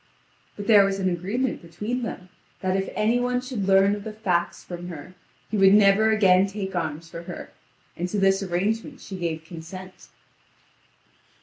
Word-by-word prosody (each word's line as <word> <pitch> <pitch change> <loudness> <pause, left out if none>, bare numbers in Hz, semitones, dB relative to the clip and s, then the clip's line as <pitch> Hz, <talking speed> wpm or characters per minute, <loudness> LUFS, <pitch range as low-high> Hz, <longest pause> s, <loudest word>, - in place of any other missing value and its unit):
But 205 - -6
there 205 -2 +7
was 195 0 0
an 190 -1 0
agreement 205 +9 -2
between 210 +9 -4
them 190 -6 -6 0.3
that 185 0 0
if 195 0 -1
any 225 +3 +2
one 250 0 0
should 250 -6 -4
learn 195 +1 +5
of 205 - -8
the 220 - -5
facts 180 -5 -1
from 175 0 -7
her, 175 +1 -9 0.4
he 215 - 0
would 195 0 +7
never 210 +1 +5
again 195 -3 +5
take 195 -1 -5
arms 165 -1 -3
for 170 0 -8
her, 170 - -8 0.4
and 175 +1 -3
to 210 - -2
this 195 0 +3
arrangement 210 +9 -2
she 195 - -8
gave 165 -3 -3
consent. 180 +3 -10
195 Hz, 175 wpm, -25 LUFS, 175-215 Hz, 0.4 s, there